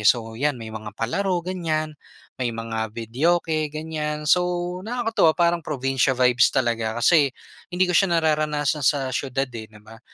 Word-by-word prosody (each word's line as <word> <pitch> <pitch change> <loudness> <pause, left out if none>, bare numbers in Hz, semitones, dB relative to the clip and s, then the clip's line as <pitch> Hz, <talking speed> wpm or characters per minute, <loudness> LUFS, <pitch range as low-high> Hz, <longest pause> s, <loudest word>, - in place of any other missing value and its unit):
So 115 -2 +2
'yan, 140 +4 -1
may 110 -2 -8
mga 110 -1 -6
palaro 180 - 0
ganyan, 160 -4 -2 0.5
may 125 - 0
mga 115 -1 -4
videoke 155 +8 0
ganyan. 150 0 -4
So 180 +4 +5 0.4
nakakatuwa 225 -7 +1
parang 170 0 +3
probinsiya 135 -2 0
vibes 125 -1 +5
talaga 115 -3 0
kasi 145 +3 +4 0.4
hindi 180 +1 +2
ko 180 - -1
siya 175 -1 +4
nararanasan 150 -2 0
sa 135 -1 +1
siyudad 135 0 -1
eh, 110 -1 -7
'di 110 - -15
ba? 115 +1 -13
145 Hz, 155 wpm, -23 LUFS, 120-160 Hz, 0.5 s, So